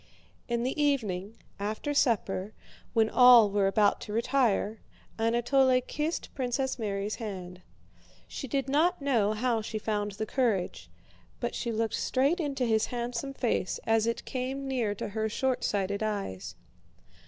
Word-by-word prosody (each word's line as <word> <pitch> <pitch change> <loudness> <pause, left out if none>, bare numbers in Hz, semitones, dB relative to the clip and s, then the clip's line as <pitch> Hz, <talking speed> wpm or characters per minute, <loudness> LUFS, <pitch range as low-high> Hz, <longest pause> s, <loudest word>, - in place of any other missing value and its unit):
In 235 0 -1
the 265 +4 -1
evening, 220 -8 0 0.2
after 215 +8 -2
supper, 215 -6 +1 0.4
when 225 -2 +4
all 240 -3 +7
were 200 -1 +2
about 205 +1 +3
to 210 - -6
retire, 225 -3 +1 0.4
Anatole 250 +3 +3
kissed 300 +6 -3
Princess 265 0 -2
Mary's 205 -1 -2
hand. 185 -5 -7 0.7
She 270 - -6
did 270 +1 -1
not 325 +6 +2
know 235 -7 +2
how 230 +1 0
she 220 0 -4
found 210 -1 -2
the 220 +2 -3
courage, 220 -7 -1 0.5
but - - -2
she 235 - -3
looked 225 0 -1
straight 280 +7 +1
into 275 -5 -1
his 220 -2 +2
handsome 245 +3 -4
face 225 -8 -1
as 225 0 +2
it 230 - -2
came 265 +2 -3
near 240 -6 -1
to - - -5
her 220 +1 -2
shortsighted 205 -5 -1
eyes. 200 - -3
230 Hz, 140 wpm, -29 LUFS, 210-260 Hz, 0.7 s, all